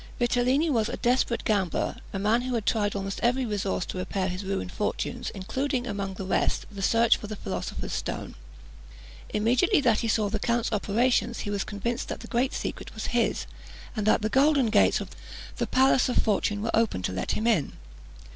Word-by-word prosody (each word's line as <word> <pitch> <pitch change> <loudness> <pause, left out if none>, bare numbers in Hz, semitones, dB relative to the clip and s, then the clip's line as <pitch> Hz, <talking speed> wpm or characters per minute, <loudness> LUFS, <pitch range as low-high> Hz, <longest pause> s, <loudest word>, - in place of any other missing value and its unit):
Vitellini 250 +5 +2
was 225 -4 +1
a 245 - -4
desperate 245 -1 +1
gambler, 195 -5 0
a - - -3
man 215 +4 +2
who 255 0 -2
had 220 -3 -2
tried 205 -3 +1
almost 195 0 -3
every 250 +2 +2
resource 200 -4 -1
to 185 - -5
repair 190 +1 -1
his 185 +2 -4
ruined 190 -1 -3
fortunes, 240 +4 -2
including 255 +6 -2
among 200 -4 -3
the 190 - -5
rest 190 - 0
the 200 -1 -7
search 230 +4 +4
for 210 - -8
the 215 - -5
philosopher's 95 - -4
stone. - - -4 1.0
Immediately 245 - +3
that 235 -5 +3
he 230 - -1
saw 215 -1 +2
the 215 +1 -2
count's 235 +1 0
operations, 230 +3 +1
he 205 - -4
was 200 -1 -1
convinced 235 +4 -3
that - - -5
the - - -9
great 255 +2 0
secret - - -5
was - - -4
his, - - +1 0.5
and 215 -2 -1
that 215 - +4
the 215 - +1
golden 270 -1 +3
gates - - +4
of - - -6 0.5
the - - -1
palace 260 0 +4
of 250 - 0
fortune 205 -1 +1
were 230 - -1
open 225 - +1
to - - -1
let 95 - -2
him 220 - -2
in. 210 -12 +2
220 Hz, 195 wpm, -27 LUFS, 200-245 Hz, 1.0 s, search